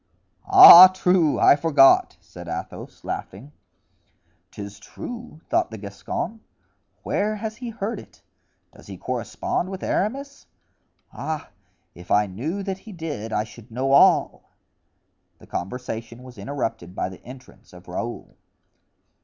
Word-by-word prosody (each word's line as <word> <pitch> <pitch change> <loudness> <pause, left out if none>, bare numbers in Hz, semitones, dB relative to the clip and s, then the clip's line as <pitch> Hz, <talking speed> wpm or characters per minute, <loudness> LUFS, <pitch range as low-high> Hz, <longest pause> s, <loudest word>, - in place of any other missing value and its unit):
"Ah, 375 - +11
true! 180 -4 +1
I - - +6
forgot," 145 -3 +4
said - - -13
Athos, - - -8
laughing. 120 +10 -7 1.0
"'Tis 100 -1 -10
true!" 235 - -10
thought - - 0
the 110 - -9
Gascon, 100 - -6 0.6
"where 210 +1 -1
has 215 0 -6
he 245 -1 -7
heard 225 0 -5
it? - - -17 0.5
Does - - -17
he - - -9
correspond 185 - -3
with 190 -1 -7
Aramis? 275 +7 -3 0.7
Ah! 155 -1 -6 0.4
if 90 +1 -15
I 105 +1 +3
knew 145 - -5
that 190 -1 -5
he 220 - -13
did 155 - -6
I 105 - 0
should 115 +1 -15
know 130 +4 -2
all." 140 - +3 0.9
The - - -17
conversation 115 +3 -6
was 125 -4 -13
interrupted 110 -6 -5
by - - -2
the 95 -1 -12
entrance 130 +1 -15
of 90 0 -16
Raoul. 115 +7 -6
140 Hz, 130 wpm, -23 LUFS, -, 1.0 s, Ah